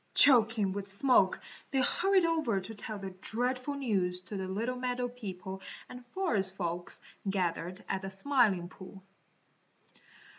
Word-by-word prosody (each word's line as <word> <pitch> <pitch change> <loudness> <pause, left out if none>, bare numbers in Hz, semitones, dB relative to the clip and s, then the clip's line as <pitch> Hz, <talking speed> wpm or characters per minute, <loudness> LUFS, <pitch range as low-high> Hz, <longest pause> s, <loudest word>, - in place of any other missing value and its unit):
Choking 225 -6 +7
with 200 0 -5
smoke, 250 +6 +3 0.3
they 270 - +1
hurried 380 +6 +3
over 315 -11 +1
to 190 +4 -5
tell 215 0 -5
the 195 -1 -6
dreadful 250 +8 -2
news 195 -10 0
to 200 +3 -8
the 190 -1 -3
little 225 +7 -2
meadow 250 0 -1
people 190 -6 -7 0.3
and 250 0 -10
forest 215 - -1
folks 175 -1 -3 0.3
gathered 180 -1 -2
at 190 - -1
the 195 - -5
Smiling 195 -4 +2
Pool. 190 +1 -12
205 Hz, 140 wpm, -31 LUFS, 190-250 Hz, 0.3 s, Choking